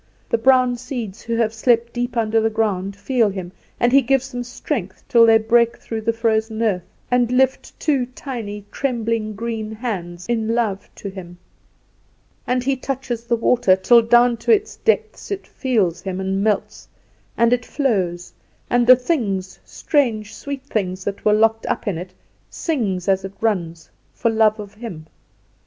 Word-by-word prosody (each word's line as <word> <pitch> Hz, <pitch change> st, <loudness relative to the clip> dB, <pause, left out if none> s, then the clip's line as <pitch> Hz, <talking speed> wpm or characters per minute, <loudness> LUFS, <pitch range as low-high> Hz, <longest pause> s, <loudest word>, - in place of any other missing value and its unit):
The 230 Hz, -, +1 dB
brown 255 Hz, 0 st, +4 dB
seeds, 235 Hz, -5 st, -6 dB
who 230 Hz, 0 st, -3 dB
have 225 Hz, -1 st, +1 dB
slept 235 Hz, +1 st, +1 dB
deep 245 Hz, 0 st, -3 dB
under 225 Hz, 0 st, +2 dB
the 225 Hz, -, +2 dB
ground, 200 Hz, -3 st, -1 dB
feel 230 Hz, +1 st, +1 dB
him, 185 Hz, -3 st, -6 dB, 0.3 s
and 240 Hz, -, +3 dB
he 275 Hz, +1 st, +6 dB
gives 270 Hz, +1 st, 0 dB
them 245 Hz, 0 st, -4 dB
strength, 240 Hz, -, -5 dB
till 230 Hz, -1 st, +6 dB
they 225 Hz, 0 st, +7 dB
break 235 Hz, +1 st, +2 dB
through 225 Hz, -1 st, -5 dB
the 230 Hz, +1 st, +1 dB
frozen 225 Hz, -1 st, 0 dB
earth, 200 Hz, -5 st, +1 dB, 0.3 s
and 245 Hz, -1 st, +2 dB
lift 265 Hz, +1 st, +1 dB
two 275 Hz, -6 st, +1 dB
tiny, 230 Hz, -6 st, -7 dB
trembling 230 Hz, -5 st, -2 dB
green 220 Hz, 0 st, -4 dB
hands 180 Hz, -7 st, -5 dB
in 230 Hz, -1 st, 0 dB
love 215 Hz, -5 st, -1 dB
to -, -, -7 dB
him. 175 Hz, -2 st, -10 dB, 1.1 s
And 250 Hz, 0 st, +1 dB
he 275 Hz, +1 st, +1 dB
touches 255 Hz, -3 st, -4 dB
the 235 Hz, -, +1 dB
water, 230 Hz, -4 st, +3 dB
till 235 Hz, +5 st, +5 dB
down 240 Hz, +1 st, +4 dB
to 235 Hz, -, 0 dB
its 430 Hz, -1 st, +2 dB
depths 450 Hz, -1 st, -1 dB
it 400 Hz, -1 st, -4 dB
feels 215 Hz, -, 0 dB
him 190 Hz, -1 st, -4 dB
and 190 Hz, +1 st, -1 dB
melts, 210 Hz, -2 st, -1 dB, 0.5 s
and 235 Hz, +1 st, +4 dB
it 245 Hz, 0 st, 0 dB
flows, 190 Hz, -, -1 dB, 0.4 s
and 240 Hz, -1 st, +3 dB
the 255 Hz, -, +10 dB
things, 215 Hz, -, -2 dB
strange 225 Hz, -8 st, -1 dB
sweet 280 Hz, -2 st, -6 dB
things 190 Hz, -8 st, -3 dB
that 200 Hz, 0 st, -4 dB
were 210 Hz, -, +4 dB
locked 225 Hz, +1 st, +2 dB
up 235 Hz, -, -2 dB
in 180 Hz, -5 st, -1 dB
it, 180 Hz, +1 st, -7 dB
it 185 Hz, -, -31 dB, 0.3 s
sings 205 Hz, -, -2 dB
as 190 Hz, -1 st, +2 dB
it 195 Hz, 0 st, -6 dB
runs, 170 Hz, -7 st, -2 dB, 0.2 s
for 230 Hz, -, +1 dB
love 220 Hz, -1 st, +3 dB
of 205 Hz, -1 st, -8 dB
him. 210 Hz, -9 st, -8 dB
225 Hz, 175 wpm, -21 LUFS, 200-245 Hz, 1.1 s, the